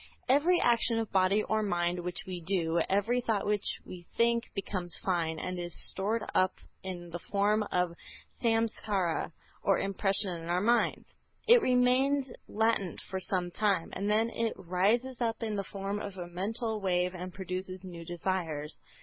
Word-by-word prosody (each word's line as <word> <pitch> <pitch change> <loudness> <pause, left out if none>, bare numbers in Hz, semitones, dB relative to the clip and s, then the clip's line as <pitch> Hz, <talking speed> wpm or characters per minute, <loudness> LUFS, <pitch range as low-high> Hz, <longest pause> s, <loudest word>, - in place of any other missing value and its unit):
Every 305 +7 +4
action 235 -1 +3
of 225 -1 -2
body 195 +2 +3
or 220 0 0
mind 175 -3 0
which 180 0 -3
we 180 -2 -5
do, 170 -2 +1
every 215 +6 +2
thought 220 -4 0
which 205 -1 0
we 175 -2 -10
think, 235 0 +3
becomes 185 -3 -3
fine, 165 -4 0
and 180 +2 -4
is 175 -1 +1
stored 215 +4 -1
up 185 0 +3 0.3
in 175 -2 -6
the 175 - -4
form 205 +4 +1
of 180 -1 +1
a - - -13 0.5
Samskâra 220 -7 0 0.3
or 195 - +3
impression 195 0 +1
in 165 - -7
our 175 +1 +2
minds. 235 +5 +2 0.4
It 475 +1 +8
remains 255 +1 +3 0.2
latent 220 -5 0
for 190 - -1
some 180 -1 -1
time, 195 -4 +1
and 200 +2 -2
then 220 +2 +2
it 230 -1 -1
rises 210 +8 +1
up 230 0 -1
in 215 -2 -2
the 200 - -1
form 195 +1 -4
of 200 -2 -6
a 175 - -4
mental 215 +5 -2
wave 180 -1 +1
and 180 0 -6
produces 185 0 -5
new 175 -3 -8
desires. 165 -3 -3
195 Hz, 165 wpm, -30 LUFS, 180-225 Hz, 0.5 s, It